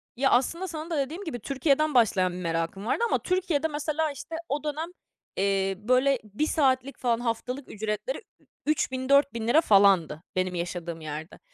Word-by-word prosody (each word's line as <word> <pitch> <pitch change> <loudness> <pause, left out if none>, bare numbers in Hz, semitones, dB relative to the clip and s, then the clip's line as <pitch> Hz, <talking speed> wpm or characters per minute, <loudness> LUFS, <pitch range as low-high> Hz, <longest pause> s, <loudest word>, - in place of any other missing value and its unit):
Ya, 270 +2 +2
aslında 335 +9 +2
sana 320 0 -6
da 325 - -1
dediğim 305 +8 -2
gibi 295 -9 -5
Türkiye'den 280 +4 +1
başlayan 190 -7 +3
bir 180 - -6
merakım 165 +3 -2
vardı 440 - 0
ama - - +1
Türkiye'de 355 -5 0
mesela, 305 +1 -1
işte, 285 +4 -7
o 285 +2 -1
dönem, 310 +3 -3 0.5
eee, 195 0 +1
böyle 255 +5 +2
1 215 +9 -2
saatlik 270 -3 +1
falan 235 -2 +1
haftalık 250 +3 -3
ücretleri 215 - -3 0.5
ü-üç 305 -3 +1
bin 260 +1 -4
4000 280 -5 +3
lira 295 +7 +5
falandı 195 - +4
benim 185 0 0
yaşadığım 170 -1 -4
yerde 155 +2 -7
255 Hz, 165 wpm, -27 LUFS, 195-300 Hz, 0.5 s, lira